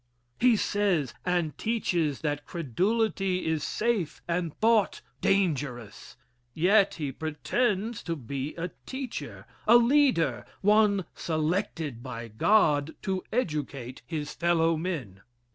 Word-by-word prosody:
He 245 Hz, -1 st, +5 dB
says 200 Hz, -, +1 dB
and 175 Hz, -4 st, 0 dB
teaches 175 Hz, -, 0 dB
that 145 Hz, -2 st, -2 dB
credulity 190 Hz, -, 0 dB
is 160 Hz, -2 st, 0 dB
safe 215 Hz, -8 st, -1 dB
and 170 Hz, -1 st, -1 dB
thought 220 Hz, -2 st, +3 dB, 0.2 s
dangerous. 145 Hz, -, -1 dB, 0.4 s
Yet 195 Hz, +4 st, +4 dB
he 150 Hz, -4 st, -3 dB
pretends 205 Hz, -, -1 dB
to 170 Hz, -, -1 dB
be 140 Hz, +1 st, -5 dB
a 170 Hz, +1 st, -4 dB, 0.2 s
teacher 260 Hz, -2 st, -6 dB, 0.2 s
a 235 Hz, +2 st, +9 dB
leader, 235 Hz, -, +3 dB, 0.2 s
one 205 Hz, -2 st, +4 dB
selected 160 Hz, -, -2 dB
by 120 Hz, -2 st, -7 dB
God 150 Hz, -, +3 dB
to 190 Hz, -1 st, -1 dB
educate 145 Hz, -, -3 dB
his 150 Hz, -3 st, -4 dB
fellow 165 Hz, -1 st, +2 dB
men. 150 Hz, -, -4 dB
170 Hz, 110 wpm, -28 LUFS, 145-205 Hz, 0.4 s, a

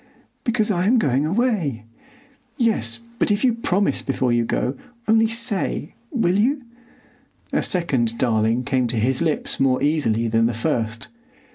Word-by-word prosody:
"Because 230 Hz, -4 st, +1 dB
I 180 Hz, -1 st, +1 dB
am 245 Hz, +4 st, +4 dB
going 140 Hz, -, +1 dB
away." 180 Hz, -, 0 dB, 0.7 s
"Yes, 230 Hz, -1 st, +1 dB, 0.2 s
but -, -, +2 dB
if 205 Hz, 0 st, +1 dB
you 250 Hz, -2 st, +4 dB
promise 205 Hz, -3 st, 0 dB
before 130 Hz, -2 st, 0 dB
you 120 Hz, 0 st, +2 dB
go. 125 Hz, +3 st, -1 dB, 0.3 s
Only 225 Hz, +1 st, +4 dB
say—will 225 Hz, -, -1 dB
you?" 265 Hz, +5 st, +1 dB, 0.9 s
A -, -, +2 dB
second 130 Hz, -, 0 dB
"darling' 115 Hz, 0 st, +1 dB
came 130 Hz, -1 st, 0 dB
to 120 Hz, 0 st, -3 dB
his 125 Hz, +6 st, +1 dB
lips 160 Hz, -3 st, 0 dB
more 130 Hz, -1 st, +3 dB
easily 120 Hz, -7 st, +1 dB
than 115 Hz, 0 st, +2 dB
the 120 Hz, -, -2 dB
first. 115 Hz, 0 st, -2 dB
150 Hz, 145 wpm, -22 LUFS, -, 0.9 s, am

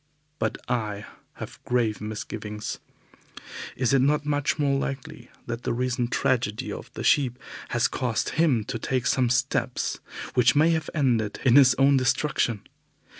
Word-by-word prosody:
But -, -, -1 dB
I 105 Hz, -5 st, -2 dB, 0.3 s
have -, -, -10 dB
grave 120 Hz, -4 st, 0 dB
misgivings. 105 Hz, 0 st, -5 dB, 1.0 s
Is 125 Hz, 0 st, +1 dB
it 135 Hz, -, +5 dB
not 145 Hz, +2 st, +2 dB
much 145 Hz, -1 st, 0 dB
more 140 Hz, -2 st, +1 dB
likely 135 Hz, -1 st, -6 dB, 0.2 s
that 120 Hz, 0 st, -4 dB
the -, -, -1 dB
recent 120 Hz, 0 st, -1 dB
tragedy 115 Hz, -5 st, 0 dB
of -, -, -9 dB
the -, -, -5 dB
sheep 130 Hz, -4 st, +3 dB, 0.3 s
has 120 Hz, -1 st, +2 dB
caused 120 Hz, -4 st, -1 dB
him 150 Hz, -9 st, +2 dB
to 115 Hz, +1 st, -5 dB
take 130 Hz, +1 st, -1 dB
some 125 Hz, 0 st, +2 dB
steps 125 Hz, 0 st, 0 dB, 0.3 s
which 125 Hz, +3 st, +4 dB
may 155 Hz, +3 st, +5 dB
have 160 Hz, -2 st, -1 dB
ended 120 Hz, -8 st, +1 dB
in 125 Hz, -1 st, +5 dB
his 130 Hz, -3 st, +7 dB
own 135 Hz, 0 st, +4 dB
destruction? 125 Hz, -4 st, 0 dB
125 Hz, 150 wpm, -25 LUFS, 115-140 Hz, 1.0 s, his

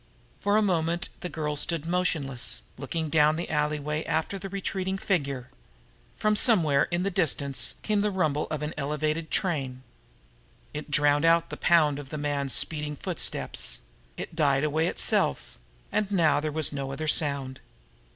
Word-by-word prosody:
For 205 Hz, +1 st, +2 dB
a 215 Hz, -, +3 dB
moment 170 Hz, -2 st, 0 dB
the 180 Hz, -, -5 dB
girl 150 Hz, -3 st, -3 dB
stood 155 Hz, +1 st, +1 dB
there 165 Hz, -, -5 dB
motionless, 140 Hz, -, -1 dB
looking 160 Hz, -2 st, -4 dB
down 155 Hz, -1 st, +4 dB
the 170 Hz, -, -4 dB
alleyway 150 Hz, 0 st, -1 dB
after 160 Hz, +5 st, -2 dB
the 195 Hz, +1 st, -7 dB
retreating 190 Hz, 0 st, -3 dB
figure. 140 Hz, -10 st, -2 dB, 0.7 s
From 215 Hz, 0 st, +1 dB
somewhere 175 Hz, -, +4 dB
in 175 Hz, +1 st, -1 dB
the 200 Hz, -, -1 dB
distance 140 Hz, -8 st, 0 dB
came 210 Hz, -2 st, +1 dB
the 210 Hz, -, +1 dB
rumble 155 Hz, -7 st, 0 dB
of 150 Hz, -1 st, -3 dB
an 150 Hz, -, -3 dB
elevated 150 Hz, +2 st, -2 dB
train. 135 Hz, -8 st, -2 dB, 0.9 s
It 150 Hz, +1 st, -6 dB
drowned 145 Hz, 0 st, +3 dB
out 165 Hz, 0 st, +3 dB
the -, -, -4 dB
pound 155 Hz, -5 st, +3 dB
of 140 Hz, -2 st, -9 dB
the 155 Hz, -, -5 dB
man's 145 Hz, -2 st, 0 dB
speeding 150 Hz, -2 st, +2 dB
footsteps; -, -, -1 dB, 0.4 s
it 165 Hz, -, -7 dB
died 140 Hz, -4 st, +2 dB
away 155 Hz, +2 st, +1 dB
itself 120 Hz, -, +1 dB, 0.3 s
and 210 Hz, -2 st, 0 dB
now 160 Hz, -7 st, +3 dB
there 155 Hz, +1 st, -3 dB
was 155 Hz, 0 st, +2 dB
no 135 Hz, -1 st, -4 dB
other 155 Hz, +3 st, -4 dB
sound. 140 Hz, -4 st, +2 dB
155 Hz, 160 wpm, -27 LUFS, 145-175 Hz, 0.9 s, down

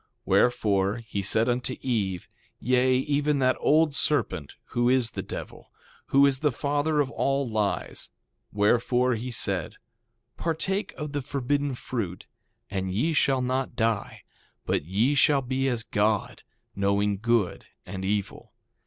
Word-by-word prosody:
Wherefore, 105 Hz, -5 st, +2 dB
he 110 Hz, -4 st, -4 dB
said 110 Hz, +4 st, +2 dB
unto 125 Hz, +1 st, -1 dB
Eve, 100 Hz, -8 st, -2 dB, 0.3 s
yea, 130 Hz, +1 st, +3 dB
even 145 Hz, +2 st, +1 dB
that 130 Hz, -1 st, +2 dB
old 155 Hz, 0 st, +3 dB
serpent, 135 Hz, -, -1 dB
who 120 Hz, 0 st, +1 dB
is 125 Hz, -2 st, +2 dB
the -, -, -4 dB
devil, -, -, -8 dB, 0.4 s
who 140 Hz, +1 st, +5 dB
is 135 Hz, -2 st, +2 dB
the 150 Hz, 0 st, +2 dB
father 145 Hz, +4 st, 0 dB
of 140 Hz, -1 st, -2 dB
all 140 Hz, -1 st, 0 dB
lies, 110 Hz, -3 st, -2 dB, 0.4 s
wherefore 120 Hz, +4 st, +2 dB
he 120 Hz, +3 st, -4 dB
said: 100 Hz, -8 st, 0 dB, 0.6 s
Partake 180 Hz, +5 st, -2 dB
of 150 Hz, -1 st, -6 dB
the 145 Hz, 0 st, -2 dB
forbidden 140 Hz, +1 st, -1 dB
fruit, 105 Hz, -8 st, -5 dB, 0.4 s
and 95 Hz, -2 st, -3 dB
ye 125 Hz, -, 0 dB
shall 135 Hz, -3 st, +2 dB
not 130 Hz, +1 st, -2 dB
die, 110 Hz, -3 st, -1 dB, 0.4 s
but -, -, 0 dB
ye 105 Hz, -, +1 dB
shall 140 Hz, -1 st, +4 dB
be 130 Hz, +1 st, -1 dB
as 120 Hz, -3 st, -1 dB
God, 105 Hz, -2 st, 0 dB, 0.3 s
knowing 100 Hz, 0 st, +1 dB
good 115 Hz, -4 st, 0 dB, 0.2 s
and 95 Hz, -1 st, -6 dB
evil. 100 Hz, 0 st, -3 dB
125 Hz, 140 wpm, -26 LUFS, 105-140 Hz, 0.6 s, who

